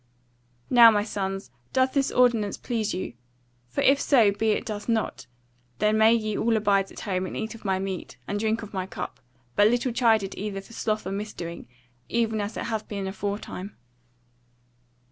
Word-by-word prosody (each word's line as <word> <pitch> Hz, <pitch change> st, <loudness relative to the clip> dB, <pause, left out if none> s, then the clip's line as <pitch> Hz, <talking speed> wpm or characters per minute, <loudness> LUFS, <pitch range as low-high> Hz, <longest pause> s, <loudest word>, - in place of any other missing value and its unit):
"Now, 240 Hz, -2 st, +9 dB
my 205 Hz, -2 st, +2 dB
sons, 195 Hz, -, -4 dB, 0.2 s
doth 260 Hz, 0 st, +2 dB
this 275 Hz, -1 st, +2 dB
ordinance 230 Hz, -5 st, +3 dB
please 225 Hz, -4 st, -2 dB
you? 180 Hz, -, -4 dB, 0.6 s
For 125 Hz, -, -1 dB
if 275 Hz, +1 st, +4 dB
so 230 Hz, -8 st, +5 dB
be 220 Hz, +2 st, 0 dB
it 215 Hz, -, +1 dB
doth 210 Hz, 0 st, -5 dB
not, 220 Hz, -, -1 dB, 0.5 s
then 215 Hz, +6 st, +2 dB
may 220 Hz, +1 st, +7 dB
ye 215 Hz, -2 st, +1 dB
all 230 Hz, -1 st, +2 dB
abide 200 Hz, -2 st, +2 dB
at -, -, -9 dB
home, 185 Hz, -3 st, -1 dB
and -, -, -6 dB
eat 220 Hz, +1 st, -3 dB
of 225 Hz, -, -13 dB
my 190 Hz, -1 st, +1 dB
meat, 190 Hz, -8 st, -5 dB
and 205 Hz, -, -2 dB
drink 220 Hz, +1 st, 0 dB
of 210 Hz, -, -10 dB
my 185 Hz, -1 st, -2 dB
cup, -, -, -6 dB, 0.4 s
but 205 Hz, -, +6 dB
little 245 Hz, +2 st, +1 dB
chided 225 Hz, -5 st, +2 dB
either 200 Hz, -1 st, -4 dB
for 195 Hz, +4 st, -13 dB
sloth 215 Hz, -1 st, -1 dB
or -, -, -3 dB
misdoing, 195 Hz, -4 st, -5 dB, 0.4 s
even 225 Hz, -2 st, +1 dB
as 205 Hz, +2 st, -4 dB
it -, -, -2 dB
hath 220 Hz, -2 st, -3 dB
been 200 Hz, -2 st, -4 dB
aforetime." 200 Hz, 0 st, -5 dB
215 Hz, 185 wpm, -26 LUFS, 195-230 Hz, 0.6 s, Now